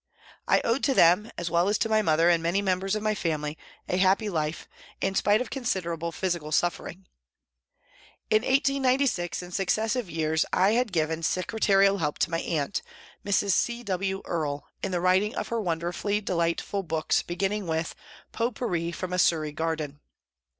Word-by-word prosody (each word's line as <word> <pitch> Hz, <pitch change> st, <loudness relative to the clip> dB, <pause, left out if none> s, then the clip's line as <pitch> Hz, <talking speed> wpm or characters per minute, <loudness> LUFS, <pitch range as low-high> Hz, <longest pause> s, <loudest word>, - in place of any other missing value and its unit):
I -, -, +4 dB
owed 230 Hz, +4 st, 0 dB
to 275 Hz, -2 st, +2 dB
them, 180 Hz, +7 st, +5 dB
as 170 Hz, -1 st, -3 dB
well 170 Hz, +3 st, +3 dB
as 210 Hz, -, +2 dB
to -, -, 0 dB
my 220 Hz, -1 st, +3 dB
mother 165 Hz, -3 st, +3 dB
and 170 Hz, -1 st, +4 dB
many 170 Hz, +4 st, +1 dB
members 195 Hz, 0 st, 0 dB
of 215 Hz, -, -3 dB
my 215 Hz, 0 st, +1 dB
family, 155 Hz, -6 st, -2 dB, 0.3 s
a 180 Hz, -, 0 dB
happy 195 Hz, +3 st, +3 dB
life, 155 Hz, -1 st, -2 dB, 0.3 s
in 195 Hz, -, 0 dB
spite 205 Hz, +3 st, +3 dB
of 250 Hz, -, -5 dB
considerable 170 Hz, -, -2 dB
physical 170 Hz, -3 st, -2 dB
suffering. 175 Hz, +3 st, -1 dB, 1.3 s
In 215 Hz, 0 st, +5 dB
1896 265 Hz, -, +1 dB
and 180 Hz, 0 st, -10 dB
successive 220 Hz, +3 st, 0 dB
years 160 Hz, -1 st, +1 dB
I 190 Hz, +3 st, +3 dB
had 235 Hz, -1 st, +1 dB
given 160 Hz, -1 st, 0 dB
secre 185 Hz, +6 st, -2 dB
tarial 195 Hz, -1 st, +4 dB
help 150 Hz, -2 st, -1 dB
to -, -, 0 dB
my 165 Hz, -, 0 dB
aunt, 155 Hz, +2 st, -2 dB, 0.4 s
Mrs. 200 Hz, 0 st, +1 dB
C. 240 Hz, +5 st, 0 dB
W. 195 Hz, -1 st, -2 dB
Earle, 145 Hz, -4 st, -2 dB, 0.2 s
in -, -, -2 dB
the 175 Hz, -1 st, -1 dB
writing 185 Hz, +4 st, +2 dB
of -, -, -3 dB
her 230 Hz, -1 st, -1 dB
wonderfully 175 Hz, +3 st, -1 dB
delightful 175 Hz, +1 st, -1 dB
books, 160 Hz, -3 st, 0 dB
begin 190 Hz, +3 st, -2 dB
ning 210 Hz, -3 st, -3 dB
with 160 Hz, 0 st, -1 dB, 0.2 s
" -, -, -22 dB
Pot 235 Hz, 0 st, -1 dB
Pourri 170 Hz, -8 st, -2 dB
from 180 Hz, +2 st, -5 dB
a 180 Hz, -, 0 dB
Surrey 155 Hz, -3 st, +2 dB
Garden." 155 Hz, -2 st, -3 dB
185 Hz, 180 wpm, -27 LUFS, 165-210 Hz, 1.3 s, them